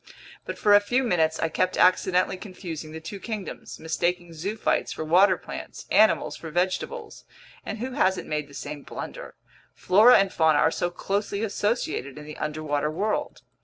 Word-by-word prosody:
But - - -5
for 205 - +4
a 205 - +9
few 245 +6 0
minutes 160 -8 +1
I 165 - +1
kept 185 +3 0
accidentally 185 0 +3
confusing 180 -5 -8
the 160 - -7
two 180 +5 -8
kingdoms, 215 -2 -6
mistaking 175 +2 -2
zoophytes 200 +7 -1
for - - -4
water 185 +4 +5
plants, - - -8
animals 215 0 +4
for 165 - -8
vegetables. 180 +3 -2 0.4
And 215 - -5
who 250 +4 -4
hasn't 190 -6 +1
made 150 -1 -2
the 140 - -14
same 145 0 -6
blunder? - - -8 0.4
Flora 215 +7 +6
and 195 -1 +1
fauna 160 -2 +4
are - - +4
so 175 - -1
closely 200 +3 -2
associated 205 - -2
in 150 - -9
the 150 - -9
underwater 150 -1 -2
world! 205 +7 -2
180 Hz, 165 wpm, -25 LUFS, 155-205 Hz, 0.4 s, a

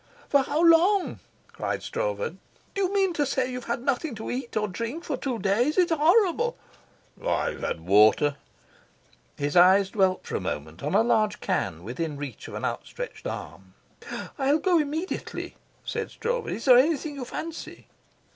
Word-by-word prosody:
"For 280 - +5
how 305 +5 0
long?" 355 +4 +4 0.3
cried - - -3
Stroeve. - - -2 0.4
"Do 395 - -2
you 375 -1 +1
mean 390 -3 +2
to 295 - +1
say 260 -2 -1
you've 250 -1 -6
had 235 +1 -2
nothing 275 0 -1
to 220 - -5
eat 245 -2 -4
or 210 0 +1
drink 230 - -5
for 295 - -2
two 260 -3 -3
days? 225 - +1
It's 355 -2 +4
horrible." 370 +9 +3 0.7
"I've - - -1
had 80 - -3
water." 105 - +4 1.0
His 145 +2 -2
eyes 190 +2 +6
dwelt 190 -3 +1
for - - -4
a - - 0
moment 75 +3 -5
on 150 - -1
a - - +5
large 215 -3 +2
can 80 +1 -2
within 145 - -4
reach 140 -2 -7
of - - -8
an - - -3
outstretched - - -5
arm. - - -8 0.6
"I'll 275 +2 +3
go 355 0 +3
immediately," 310 +5 -3 0.3
said - - -3
Stroeve. 480 0 -2
"Is 230 - -4
there 250 -2 +8
anything 300 +1 +1
you 275 -2 -6
fancy?" 320 +6 -7
260 Hz, 165 wpm, -26 LUFS, -, 1.0 s, there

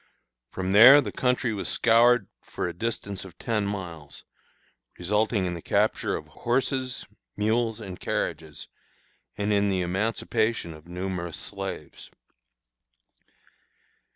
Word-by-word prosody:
From 95 0 -3
there 120 +8 +10
the 115 -8 -2
country 125 -1 0
was 100 - -3
scoured 115 -1 +4
for - - -4
a 85 - -4
distance 100 0 -4
of 90 -2 -13
ten 110 -4 -1
miles, 85 -7 -7 0.7
resulting 105 +2 +1
in 90 - -2
the 85 - -6
capture - - +1
of - - -6
horses, 130 +1 -2 0.3
mules, 110 +1 0
and 95 -5 -8
carriages, 80 -2 -3 0.7
and 105 +1 0
in 100 0 +2
the 95 -2 0
emancipation 110 +1 -1
of 75 +1 -15
numerous 90 -2 -4
slaves. 95 +1 -6
100 Hz, 120 wpm, -26 LUFS, 90-115 Hz, 0.7 s, there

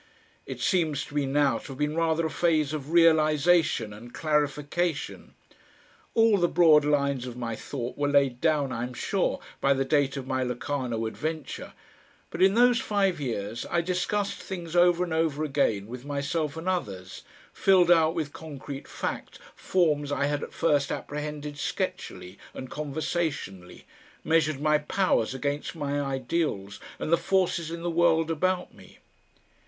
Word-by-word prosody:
It - - -6
seems 160 -6 +1
to - - -14
me 145 -2 0
now 140 0 +2
to - - -12
have 135 - -8
been 150 +1 -1
rather 165 0 +1
a - - 0
phase 155 -4 +1
of 150 -2 -5
realisation 160 -6 +3
and 115 +4 -11
clarification. 150 +2 -1 0.8
All 225 -3 +5
the 175 - +3
broad 160 -4 +5
lines 140 -3 +1
of 125 -1 -7
my 115 -2 -3
thought 125 +2 -6
were 145 - +1
laid 140 -3 +2
down, 150 -4 +2
I 115 - -3
am 125 +1 -5
sure, - - -1 0.2
by 140 0 +3
the 135 0 0
date 140 0 +1
of 135 - -5
my 130 0 -1
Locarno 125 -2 -2
adventure, 155 +6 -5 0.6
but 170 - -5
in 190 +2 +5
those 245 0 +5
five 195 -6 0
years 115 -3 -3
I 170 - +1
discussed 185 +3 -1
things 175 -3 -6
over 175 0 +5
and 170 -3 -3
over 160 -2 0
again 135 -9 0
with 120 +3 -8
myself 145 +2 -2
and 165 +3 -6
others, 100 - -3 0.3
filled 185 -3 +4
out 165 -1 +4
with 155 -4 -3
concrete 145 -3 -8
fact - - -5 0.2
forms 150 -6 +1
I 140 0 +1
had 145 0 -1
at - - -6
first 145 -4 +1
apprehended 150 0 -5
sketchily 90 -8 -4 0.2
and 130 - -7
conversationally, 150 - -4 0.4
measured 155 -3 +2
my 150 0 +3
powers 150 - 0
against 145 +4 -3
my 145 -2 -2
ideals 135 -7 -2 0.2
and 155 - -2
the - - +6
forces 175 -2 0
in 170 0 -6
the 175 - -1
world 165 -1 +3
about 180 +3 -1
me. - - -17
150 Hz, 160 wpm, -27 LUFS, 135-170 Hz, 0.8 s, the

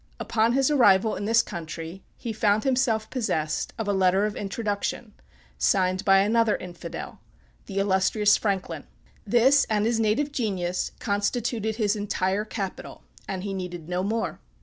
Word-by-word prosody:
Upon 225 +1 +1
his 270 +2 +2
arrival 220 -6 +4
in 200 - -4
this 225 +2 +4
country, 165 +2 -7 0.2
he 230 - -5
found 210 0 +2
himself 250 -5 +1
possessed 160 -12 -1
of 225 -2 -3
a 205 - +1
letter 190 +1 +3
of 210 - -3
introduction, 205 +1 -3 0.5
signed 185 - +2
by 195 -1 +5
another 220 +1 +3
Infidel, 175 -1 -8 0.5
the 195 - -6
illustrious 200 +2 +3
Franklin. 185 -7 -2 0.4
This, 255 +6 +5
and 210 -1 +1
his 230 0 +1
native 225 +7 +1
genius, 185 -9 -2
constituted 220 +1 -1
his 215 -2 +1
entire 205 0 -1
capital; 195 -3 -6 0.2
and 190 -1 -4
he 200 -1 -3
needed 180 -4 -6
no 180 +1 -1
more. 220 +4 -2
205 Hz, 150 wpm, -25 LUFS, 190-225 Hz, 0.5 s, by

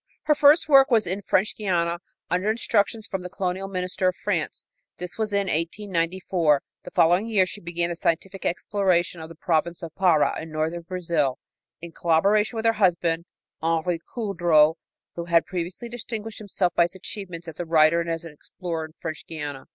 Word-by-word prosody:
Her 305 - +4
first 295 +2 +5
work 270 -2 +7
was 225 -4 +3
in 190 +3 -3
French 200 +1 +1
Guiana, 175 -4 0 0.3
under 180 +4 0
instructions 220 -1 +1
from 190 -4 -4
the 180 - -6
colonial 185 +1 -3
minister 185 -1 -1
of 185 - +1
France. 170 -7 -2 0.3
This 180 +2 -6
was 215 -1 -1
in 200 -1 +1
1894. 170 -3 0 0.2
The - - -9
following 175 +6 +3
year 205 -5 +3
she 205 +3 -8
began 170 0 -2
the - - -3
scientific 180 +3 -2
exploration 180 -2 0
of 160 - -8
the 165 - -11
province 170 +2 -1
of 165 -1 -6
Pará 170 -5 +2
in 160 - -8
northern 160 +2 -2
Brazil, 165 -6 -1 0.5
in 170 - -7
collaboration 200 +8 +2
with 225 0 -3
her 225 - +5
husband, 170 -2 +2 0.4
Henri 165 +1 0 0.2
Coudreau, 175 -8 +3 0.4
who 170 - -5
had 170 -1 +3
previously 180 +5 -5
distinguished 225 -2 -6
himself 190 -4 -1
by 170 - +4
his 175 - -7
achievements 180 -3 -7
as 160 - -9
a 175 - -2
writer 160 +1 +5
and 170 - -4
as 165 0 -3
an 165 - -9
explorer 165 +1 -5
in 155 - -14
French 160 -2 -6
Guiana. 145 -4 -6
175 Hz, 180 wpm, -25 LUFS, 165-200 Hz, 0.5 s, work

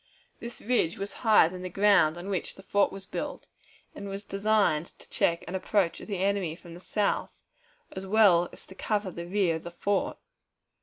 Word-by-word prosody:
This 235 0 -7
ridge 215 -8 +1
was 200 0 -5
higher 220 -8 +6
than 180 +1 -7
the 185 - -5
ground 180 -4 +4
on 175 +2 -7
which 190 -3 -2
the 195 - -14
fort 200 +1 +2
was 195 0 -8
built, - - -5 0.5
and 200 - -7
was 195 +1 -5
designed 200 -6 +1
to - - -16
check 170 0 +1
an 175 - -6
approach 190 -2 0
of - - -10
the 200 -3 -3
enemy 190 -3 0
from 170 0 -13
the 170 - -10
south, 205 +2 -1 0.6
as 190 0 -7
well 190 -4 +5
as - - -11
to - - -13
cover 205 0 -2
the 170 0 -7
rear 180 -3 +1
of 160 - -12
the 175 - -6
fort. 195 +3 -1
195 Hz, 200 wpm, -28 LUFS, 175-205 Hz, 0.6 s, higher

